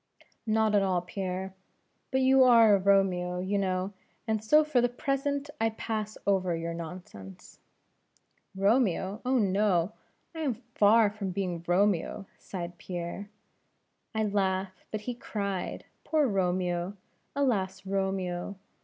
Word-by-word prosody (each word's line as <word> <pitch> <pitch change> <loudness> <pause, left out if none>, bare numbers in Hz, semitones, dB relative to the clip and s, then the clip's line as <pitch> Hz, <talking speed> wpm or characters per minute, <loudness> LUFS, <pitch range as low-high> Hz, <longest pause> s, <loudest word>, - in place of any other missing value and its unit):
"Not 220 0 +2
at 205 - +5
all, 185 -2 +1
Pierre 190 0 -4 0.6
but 265 0 +1
you 265 0 +6
are 230 -4 +7
a 200 - +4
Romeo, 185 -2 +2
you 190 +3 -1
know, 185 0 -1 0.3
and 220 -1 0
so 300 +8 +5
for 300 -5 +2
the 245 - +2
present 280 +2 -2
I 225 - +3
pass 215 -1 -4
over 185 -3 +2
your 165 0 -3
nonsense." 160 - -9 1.0
"Romeo! 200 -1 +1
oh, 260 +1 +2
no. 195 -3 +2 0.4
I 325 - -7
am 280 -7 0
far 225 -2 +3
from 205 -2 -4
being 180 -3 -3
Romeo 195 +1 +1
" - - -34
sighed 175 -2 -7
Pierre. 180 +3 -5 0.9
"I 220 - +1
laugh, 190 -2 -1
but 215 - -4
he 245 +3 -4
cried; 200 -5 -4 0.2
poor 310 -2 +2
Romeo! 180 -1 -1 0.4
alas 195 -9 0
Romeo! 190 -1 -2
200 Hz, 135 wpm, -29 LUFS, 185-220 Hz, 1.0 s, are